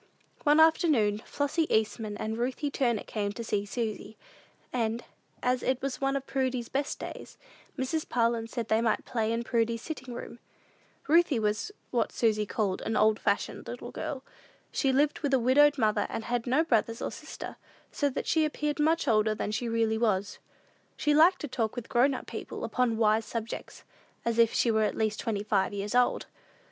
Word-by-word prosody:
One 295 +1 +5
afternoon, 305 - +4
Flossy 290 +3 -1
Eastman 215 -1 0
and 220 +1 -3
Ruthie 255 +5 -2
Turner 240 -6 0
came 205 -2 -3
to 235 - -6
see 205 -2 -1
Susy; 220 -1 -4 0.6
and, 230 -1 -1 0.4
as 250 0 +1
it 260 -1 0
was 275 -1 -4
one 275 0 +1
of 275 -1 -2
Prudy's 260 -3 -1
best 280 +1 -2
days, - - -8 0.4
Mrs. 275 +4 -2
Parlin 230 -1 +1
said 235 -3 -4
they 220 0 +2
might 225 -2 0
play 225 -2 -1
in 230 +1 -1
Prudy's 230 -1 0
sitting 260 -6 -6
room. 240 - -8 0.7
Ruthie 325 -3 +4
was 215 - -1 0.2
what 240 - +1
Susy 215 -3 +1
called 200 -4 -1
an 220 - -1
"old 215 0 +4
fashioned - - -1
little - - -7
girl." 270 -2 -5 0.5
She 270 - +1
lived 285 +3 +2
with 280 -2 +1
a - - +3
widowed 285 +5 +5
mother, 215 -3 +2
and 225 - -4
had 240 +1 -2
no 265 +6 +3
brothers 230 -5 +1
and - - -3
sisters, - - -8 0.4
so 285 - +1
that 260 - -4
she 320 -1 +2
appeared 300 0 -1
much 320 +2 +2
older 215 -1 +3
than 210 - -3
she 230 +3 -2
really 225 -1 +1
was. 205 -3 0 0.6
She 295 - +2
liked 340 +5 +5
to 295 - -3
talk 225 -4 -2
with 245 -2 -6
grown 255 +2 +3
people - - -6
upon 245 -3 0
wise 220 0 +3
subjects, 225 +1 -6 0.4
as 235 0 0
if 230 -1 +5
she 235 - +2
were 220 0 +2
at 215 - 0
least 215 -1 0
twenty 205 -3 -2
five 205 -2 +1
years 205 +2 -3
old. 245 0 +2
235 Hz, 185 wpm, -29 LUFS, 220-270 Hz, 0.7 s, One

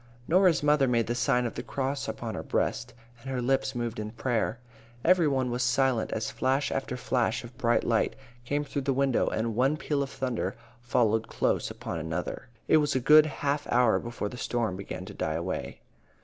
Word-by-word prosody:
Norah's 180 -3 +4
mother 145 -2 +4
made 120 -2 +2
the 120 - -1
sign 125 0 +1
of 120 - -3
the - - -4
cross 135 0 -3
upon 110 0 -4
her - - -4
breast, 120 +1 -2 0.3
and 135 - -8
her 130 -1 -2
lips 130 +1 0
moved 120 -2 -3
in 105 0 -4
prayer. 115 0 -1 0.5
Every 175 -2 +5
one 130 -3 0
was 120 +1 -1
silent 125 -1 +2
as 110 -1 -2
flash 135 +5 0
after 130 -2 -2
flash 120 -2 0
of 120 +1 -11
bright 120 -2 +2
light - - +1 0.3
came 145 +4 -1
through 145 -1 -3
the 135 0 0
window, 135 -1 +2
and 110 0 -1
one 135 +5 +2
peal 145 -2 -1
of 140 - -2
thunder 130 -3 -2 0.3
followed 115 -2 +1
close - - 0
upon 80 - -5
another. 80 +8 -4 0.2
It 160 - +6
was 145 -2 +1
a - - +3
good 155 +4 +7
half 145 0 -2
hour 120 -2 +4
before 120 -3 -4
the 125 - -8
storm 120 -5 -1
began 95 +1 -6
to - - -9
die 80 - -2
away. 90 +2 -4
125 Hz, 200 wpm, -28 LUFS, 115-140 Hz, 0.5 s, good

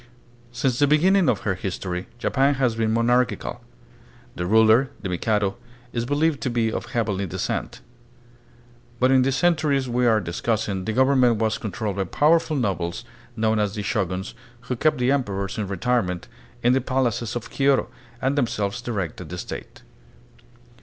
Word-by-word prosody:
Since 125 0 -1
the 145 - +4
beginning 180 +5 +4
of 105 - 0
her 100 - 0
history, 90 -1 -4
Japan 135 +3 +2
has 125 -3 +1
been 110 -1 0
monarchical. 120 +1 +1 0.7
The 90 - -3
ruler, 110 +5 +5
the 95 - -2
Mikado, 100 +2 0 0.4
is 120 -1 -1
believed 145 +2 +1
to 130 - -1
be 115 -2 0
of - - -4
heavenly 100 -4 -1
descent; - - -3 1.2
but 130 +1 +4
in 130 -1 +5
the 135 +1 +2
centuries 145 -2 +2
we 125 0 +1
are 110 -2 +4
discussing 95 +1 -2
the 110 - -1
government 130 -1 +4
was 110 0 0
controlled 105 -1 -4
by 95 - 0
powerful 155 - +2
nobles, 90 -8 -2 0.3
known 110 -1 +1
as 105 0 0
the 105 - -3
Shoguns, 95 -2 -2 0.3
who 125 - -3
kept 150 +4 +2
the 125 +1 +2
emperors 100 -8 -1
in 105 - -2
retirement 100 -2 -1 0.4
in 120 +1 +4
the 135 - +2
palaces 120 -3 -1
of 120 - -5
Kyoto, 140 0 +2 0.3
and 135 +3 0
themselves 115 -5 -1
directed 100 -9 -4
the - - -6
State. - - -8
115 Hz, 160 wpm, -23 LUFS, 100-130 Hz, 1.2 s, ruler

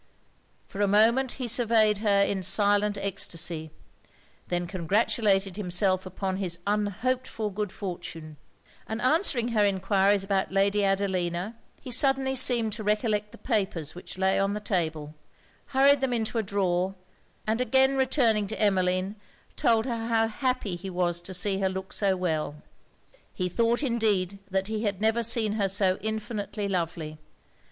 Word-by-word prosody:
For 205 - -6
a 205 - +3
moment 230 +6 +3
he 255 -2 -4
surveyed 220 -3 +3
her 205 -2 +3
in 195 -1 -1
silent 205 +2 +3
extasy, 175 -5 -3 0.8
then 175 0 -1
congratulated 195 +2 +1
himself 185 -1 0
upon 190 0 -3
his 180 -4 -2
unhoped 210 +5 -1
for 215 -2 -4
good 210 -1 -3
fortune; 165 -5 -7 0.5
and 220 +1 -4
answering 255 - +1
her 220 -3 +2
enquiries 195 0 +2
about 195 -1 -1
Lady 200 +1 +2
Adelina, 190 0 -1 0.3
he 255 - -7
suddenly 265 +1 +2
seemed 240 -4 +3
to 215 +1 -6
recollect 210 0 0
the - - -13
papers 190 - -1
which 180 +1 -9
lay 190 0 +2
on 195 +1 0
the - - -3
table, 160 -7 -2 0.5
hurried 275 +1 +4
them 265 -2 0
into 230 0 -1
a - - +2
drawer, 190 -2 -1 0.5
and 220 +3 0
again 265 +1 +3
returning 250 -6 +2
to 220 - -6
Emmeline, 185 -1 +1 0.4
told 225 -1 +2
her 230 -3 -3
how 225 -1 +2
happy 250 -4 -2
he 185 +3 -7
was 175 -1 -1
to 190 - -7
see 190 +2 0
her 190 -1 +1
look 190 0 -6
so 195 -2 +1
well. 160 -5 -2 0.8
He 180 - -1
thought 230 - +1
indeed 210 -6 0
that 190 0 0
he 215 +1 -3
had 205 -4 -2
never 220 +2 +2
seen 230 -2 +2
her 195 - +2
so 190 -1 +2
infinitely 215 -1 -3
lovely. 165 -4 -3
205 Hz, 155 wpm, -27 LUFS, 185-225 Hz, 0.8 s, hurried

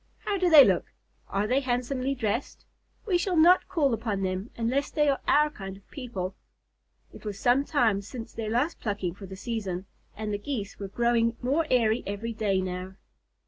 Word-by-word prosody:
How 405 -2 0
do 360 -1 +3
they 300 -5 +10
look? 190 -4 +2 0.4
Are 200 +1 0
they 255 +5 +2
handsomely 255 +1 -1
dressed? 230 0 -3 0.4
We 370 -5 +2
shall 360 -1 0
not 350 +4 +6
call 285 -7 +1
upon 215 -3 -2
them 185 +4 -2
unless 250 +5 0
they 295 -1 +1
are 275 - +1
our 300 +1 +4
kind 195 -6 -8
of 195 - -22
people." 200 -9 -5 0.8
It - - -12
was 210 -2 -5
some 245 +6 +3
time 230 -10 +2
since 225 +3 -8
their 225 -2 -4
last 255 +9 0
plucking 200 -5 -2
for 195 +1 -10
the 190 - -8
season, 195 -3 -4 0.3
and 215 -1 -3
the 205 - -2
Geese 205 -4 -5
were 200 - -4
growing 230 +2 +1
more 285 +6 0
airy 230 -2 +3
every 210 +4 -3
day 205 -4 0
now. 185 +1 -5
230 Hz, 185 wpm, -27 LUFS, 200-275 Hz, 0.8 s, they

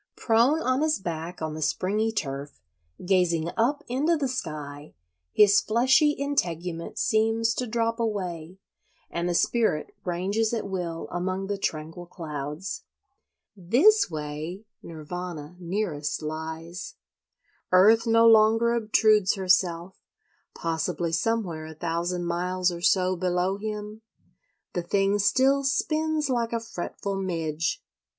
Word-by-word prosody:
Prone 245 +8 +3
on 255 +2 +1
his 310 0 +2
back 170 -2 -5
on 155 -1 -3
the 155 - -6
springy 210 +8 0
turf, 140 -8 -4 0.5
gazing 175 -3 +2
up 245 +6 +1
into 295 +7 +1
the 280 -2 -1
sky, 150 - -6 0.4
his 205 -1 +5
fleshy 265 +7 +3
integument 175 - -2
seems 225 +1 +2
to 250 +2 -3
drop 230 +1 -1
away, 185 -6 -3 0.5
and 170 +1 -2
the 175 - 0
spirit 220 -7 +1
ranges 200 +6 -1
at 220 - -3
will 175 -4 -4
among 185 +2 -2
the 200 +1 -2
tranquil 160 +1 -4
clouds. 150 +1 -6 0.7
This 255 - +4
way 155 +5 -6 0.2
Nirvana 165 0 -7
nearest 170 -5 -3
lies. 160 +4 -6 0.8
Earth 220 +6 +6
no 230 0 +5
longer 225 +1 +5
obtrudes 215 -3 +3
herself; 185 -2 +1 0.6
possibly 165 +1 -2
somewhere 170 -4 -1
a 160 - -10
thousand 175 +2 -2
miles 180 +1 0
or 170 0 -6
so 185 -1 +3
below 180 +2 0
him 210 0 -5 0.7
the 175 - -1
thing 195 +3 +1
still 265 +7 +3
"spins 310 +3 0
like 235 -3 -1
a 230 - 0
fretful 200 -2 -5
midge." 165 -4 -2
185 Hz, 120 wpm, -26 LUFS, 170-225 Hz, 0.8 s, Earth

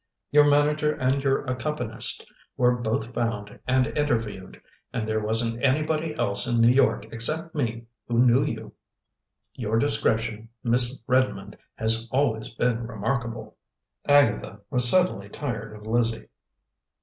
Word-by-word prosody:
Your 145 0 +6
manager 150 +1 +2
and 130 0 0
your 135 -1 +1
accompanist 130 +4 -1 0.3
were 125 0 +3
both 115 0 -3
found 115 -4 -3
and 130 0 +3
interviewed, 115 -10 -2 0.3
and 110 -3 -3
there 110 0 0
wasn't 115 +2 -1
anybody 155 +3 0
else 100 0 0
in 120 -1 +1
New 115 +1 +6
York 135 +1 +2
except 155 +9 -1
me 115 -6 -3 0.2
who 120 - -1
knew 125 +3 +4
you. 115 -7 -5 0.8
Your 110 -2 -2
discretion, 115 -4 0
Miss 120 +1 +2
Redmond, 130 +1 0 0.2
has 115 +1 0
always 125 -5 0
been 115 0 -1
remarkable." 115 +1 -4 0.5
Agatha 115 -7 +2
was 125 -2 +7
suddenly 180 - +1
tired 115 -5 -5
of 105 0 -13
Lizzie. 115 0 -1
120 Hz, 130 wpm, -25 LUFS, 115-140 Hz, 0.8 s, was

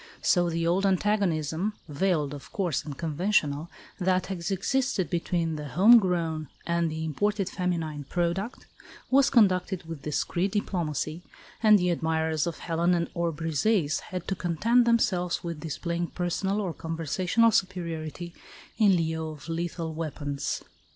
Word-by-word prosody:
So 175 -2 +3
the 165 0 -1
old 175 +3 +2
antagonism 190 -2 +1
(veiled, 150 -2 0
of 145 - -10
course, 175 -8 -1
and 145 -3 -7
conventional) 160 -2 0 0.3
that 185 0 +2
has 175 0 -4
existed 200 0 0
between 170 -2 -1
the 150 -1 -5
home 205 - +7
grown 165 -5 -1 0.2
and 170 0 +1
the 160 +1 -4
imported 205 +5 0
feminine 165 -6 -2
product, 180 - -2 0.5
was 275 +1 +5
conducted 190 -4 +3
with 165 -3 -8
discreet 170 +6 -1
diplomacy, 170 -5 -2 0.4
and 215 -2 +7
the 180 -2 +1
admirers 160 -1 0
of 170 - -3
Helen 170 +1 0
or 170 -2 0
Briseis 160 +1 +1
had 180 -2 -7
to - - 0
content 210 +8 +2
themselves 200 -7 +1
with 170 -3 -4
displaying 170 +2 -3
personal 190 +4 -1
or 185 -5 -2
conversational 170 +8 +1
superiority 170 -3 -2 0.5
in 205 -4 +6
lieu 160 -1 -1
of 155 0 -10
lethal 165 -1 -3
weapons. 145 -3 -3
170 Hz, 135 wpm, -27 LUFS, 160-190 Hz, 0.5 s, home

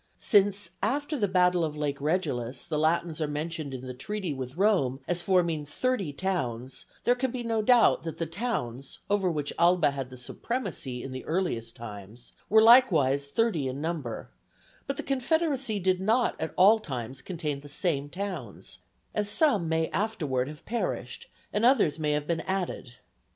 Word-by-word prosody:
Since, 205 -3 +3
after 290 +3 0
the 215 -7 +1
battle 180 -2 +3
of 150 -1 -3
Lake 145 -2 -2
Regillus, 135 -7 -1
the 155 -3 -2
Latins 160 0 +1
are 155 - +1
mentioned 150 0 -4
in 130 -1 -6
the 130 - -5
treaty 190 +5 -4
with 130 +2 -6
Rome 180 -11 +2
as 175 0 0
forming 170 -4 +2
thirty 195 - -1
towns, 135 -8 -3 0.2
there 245 - +4
can 260 +1 -1
be 245 0 -4
no 225 -1 0
doubt 240 +1 +5
that 165 -1 -6
the 165 - -1
towns, 145 - -4
over 200 -3 +2
which 150 -4 -2
Alba 175 -3 +4
had 135 -2 -5
the 130 - -10
supremacy 135 - -4
in 135 - -6
the 130 -1 -6
earliest 150 -10 -2
times, 110 +1 -10 0.2
were 220 +1 +6
likewise 160 - +6
thirty 170 - +1
in 130 +2 -4
number; 150 - -4 0.6
but 275 0 -2
the - - -3
confederacy 275 -3 0
did 185 0 +1
not 225 +5 +2
at 160 - -3
all 205 +5 +7
times 130 - -6
contain 155 -6 -3
the 145 +1 -12
same 145 -2 -1
towns, 180 - -6 0.3
as 210 -1 0
some 210 - +2
may 160 0 +1
afterward 155 - -1
have 150 0 -10
perished 235 +1 -3 0.3
and 210 - 0
others 225 - +4
may 150 -1 +1
have 150 0 -1
been 165 +1 -1
added. 185 -9 -3
165 Hz, 170 wpm, -28 LUFS, 140-205 Hz, 0.6 s, all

